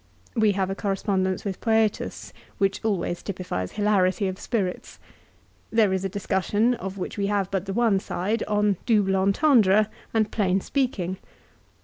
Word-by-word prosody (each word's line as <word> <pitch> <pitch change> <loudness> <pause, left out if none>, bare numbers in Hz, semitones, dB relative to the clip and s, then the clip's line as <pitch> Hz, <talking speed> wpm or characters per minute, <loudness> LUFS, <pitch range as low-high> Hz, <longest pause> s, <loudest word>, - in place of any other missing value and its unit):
We 220 -3 +3
have 190 -1 -1
a - - 0
corre 195 0 -1
spondence 190 -2 -1
with 195 -2 -3
Foetus, 220 -2 0 0.2
which 195 0 0
always 190 -5 -1
typifies 180 - -4
hilarity 200 -1 +2
of 185 0 -4
spirits. 195 -7 -3 0.7
There 220 -4 +3
is 190 0 -1
a 195 - -1
discussion, 205 +4 +1
of 195 -4 -6
which 195 +3 -5
we 200 - +1
have 200 -2 0
but 195 -1 -2
the 195 - -2
one 225 -3 +3
side, 200 +4 -2
on 210 -2 +2
" - - -28
double 205 -4 +3
entendre 210 0 +4
" - - -27
and 215 -1 +2
plain 195 -3 +1
speaking. 190 -7 -1
200 Hz, 165 wpm, -25 LUFS, 190-215 Hz, 0.7 s, entendre